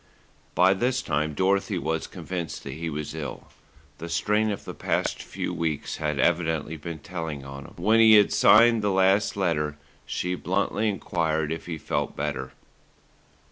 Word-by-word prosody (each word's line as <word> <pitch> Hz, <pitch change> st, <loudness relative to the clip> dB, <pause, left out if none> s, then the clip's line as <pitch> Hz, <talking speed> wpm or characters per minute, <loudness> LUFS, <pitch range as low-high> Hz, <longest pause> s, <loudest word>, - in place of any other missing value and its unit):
By 95 Hz, -, +5 dB
this 125 Hz, +6 st, 0 dB
time 75 Hz, 0 st, -1 dB
Dorothy 95 Hz, +3 st, +1 dB
was 80 Hz, -1 st, -2 dB
convinced 90 Hz, -3 st, -6 dB
that 70 Hz, -, -6 dB
he 80 Hz, +3 st, -4 dB
was 75 Hz, -1 st, -5 dB
ill. 75 Hz, -3 st, -7 dB, 0.5 s
The 85 Hz, +1 st, -6 dB
strain 105 Hz, +5 st, +1 dB
of 100 Hz, -, -4 dB
the -, -, -6 dB
past -, -, -1 dB
few -, -, -4 dB
weeks 80 Hz, -3 st, -2 dB
had 75 Hz, -2 st, -2 dB
evidently 80 Hz, +1 st, +1 dB
been 80 Hz, +2 st, -6 dB
telling 80 Hz, -3 st, -6 dB
on 70 Hz, 0 st, -8 dB
him. -, -, -13 dB
When 110 Hz, +6 st, +3 dB
he 110 Hz, -1 st, +8 dB
had 105 Hz, -1 st, +5 dB
signed 115 Hz, +1 st, +6 dB
the 105 Hz, -, +1 dB
last 95 Hz, +2 st, +2 dB
letter 75 Hz, -6 st, 0 dB, 0.3 s
she 90 Hz, 0 st, -2 dB
bluntly 100 Hz, +4 st, 0 dB
enquired 80 Hz, -5 st, -1 dB
if 80 Hz, -, -5 dB
he 85 Hz, -2 st, -4 dB
felt -, -, -2 dB
better. -, -, -3 dB
85 Hz, 165 wpm, -26 LUFS, 80-100 Hz, 0.5 s, he